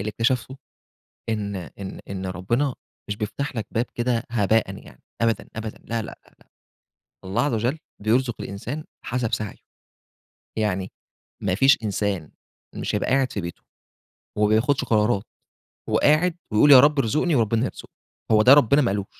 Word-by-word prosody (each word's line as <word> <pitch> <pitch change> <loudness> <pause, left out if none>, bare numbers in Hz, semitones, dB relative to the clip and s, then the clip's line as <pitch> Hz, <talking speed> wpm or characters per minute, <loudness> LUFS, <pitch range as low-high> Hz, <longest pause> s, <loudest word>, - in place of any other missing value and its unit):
اللي 100 - -3
اكتشفته 125 +4 -1 0.7
إن 100 -3 -2
إن 95 +2 -8
إن 95 -1 -4
ربنا 120 +10 -1 0.3
مش 100 - -2
بيفتح 120 +6 -4
لَك 110 - -3
باب 115 +2 0
كده 120 -1 0
هباءً 110 -1 +1
يعني 60 - -16 0.2
أبدًا، 115 -1 0
أبدًا 110 -1 -5
لا، 115 -1 -2
لأ، - - -9 0.2
لأ. - - -26 0.8
الله 95 +1 0
عز 145 - 0
وجل 120 +8 0 0.2
بيرزق 120 +2 +2
الإنسان 125 +10 -5 0.2
حسب 125 -3 -2
سعيه. 105 -2 -5 1.0
يعني 95 -3 -1 0.5
ما 90 -2 +1
فيش 135 +7 +5
إنسان 100 -6 -2 0.4
مش - - -2
هيبقى 105 - -1
قاعد 135 0 +2
في 100 - -3
بيته، 85 0 -8 0.8
وما 105 0 +3
بياخدش 130 +6 +2
قرارات، 105 -2 +2 0.7
وقاعد 160 +4 +3 0.2
ويقول 145 +7 +5
يا 130 - +11
رب 145 +1 +5
ارزقني، 150 +7 +1
وربنا 115 0 +2
هيرزقه. - - -8 0.4
هو 110 0 +6
ده 125 +5 +8
ربنا 140 +1 +5
ما 120 - +1
قالوش. 100 -1 -2
115 Hz, 155 wpm, -24 LUFS, 105-130 Hz, 1.0 s, يا